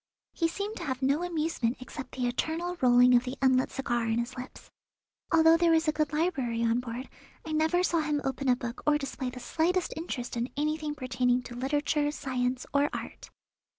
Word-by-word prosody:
He 335 - +1
seemed 405 +6 -4
to - - -5
have 260 -2 -3
no 280 +4 +2
amusement 315 -8 -1
except 255 +1 -8
the 255 -1 -1
eternal 320 +8 -1
rolling 250 0 +6
of 240 0 +5
the 255 +1 -5
unlit 260 -1 +3
cigar 240 -4 -1
in 225 0 +1
his 240 +2 -2
lips. 255 0 -9 0.6
Although 325 0 +6
there 340 0 +3
was 325 0 +3
a - - +4
good 305 -1 -1
library 280 -8 0
on 230 +1 +2
board 245 +1 -6 0.4
I 320 - -5
never 320 +3 +2
saw 340 -2 +2
him 300 -1 0
open 270 0 -1
a 250 - +5
book 240 -1 -6
or 300 0 +5
display 270 -2 -4
the 250 - -8
slightest 345 +7 0
interest 265 -8 -4
in 235 +2 -2
anything 305 0 -1
pertaining 250 -2 0
to 240 - -9
literature, 290 +3 0
science, 255 -3 -2
or 285 +1 +3
art. - - -7
270 Hz, 195 wpm, -29 LUFS, 250-315 Hz, 0.6 s, rolling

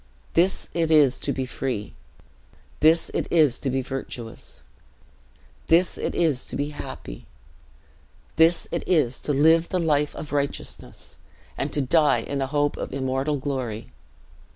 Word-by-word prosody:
"This 180 +3 +2
it 165 -2 0
is 150 -5 +5
to 140 - -2
be 130 -1 -2
free; 125 -4 -4 0.9
this 160 +2 +4
it - - -1
is 155 -7 +3
to 135 - -2
be 130 0 -1
virtuous; 125 -3 -7 1.0
this 170 +2 +4
it - - -3
is 155 -7 +1
to - - -6
be 145 +1 -1
happy; - - -8 1.1
this 165 +2 +4
it 170 - -1
is 145 -9 +2
to - - -2
live 160 +4 +4
the 185 - 0
life 150 -4 +1
of 150 - -7
righteousness, 140 - -4 0.4
and 140 - -3
to 145 - +1
die 145 +1 +3
in 140 - -4
the 135 - -1
hope 145 +1 0
of - - -5
immortal 135 +2 -1
glory. 130 - -4
145 Hz, 150 wpm, -24 LUFS, 130-160 Hz, 1.1 s, is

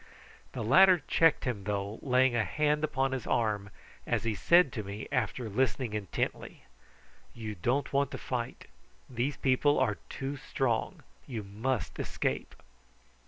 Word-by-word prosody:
The - - -3
latter 180 - +6
checked 165 -2 +3
him, 110 -7 -3
though, 100 +1 -3
laying 130 -1 +3
a 115 - +2
hand 150 +4 0
upon 135 -3 0
his 130 -3 -4
arm 105 -3 0 0.4
as - - 0
he 115 -1 0
said 170 - +4
to 110 - -3
me, 100 +2 -6
after 125 -2 -1
listening 125 +1 0
intently: 105 -3 -3 0.7
"You 110 -2 -5
don't 120 +12 -1
want 140 -1 +2
to - - -6
fight. 120 -2 -4 0.4
These 130 +4 -2
people 140 +2 +3
are 105 -8 +1
too 135 +1 -4
strong. 125 -4 -2 0.2
You 115 -5 -4
must 110 +3 -3
escape." 65 0 -2
125 Hz, 145 wpm, -30 LUFS, 105-135 Hz, 0.7 s, latter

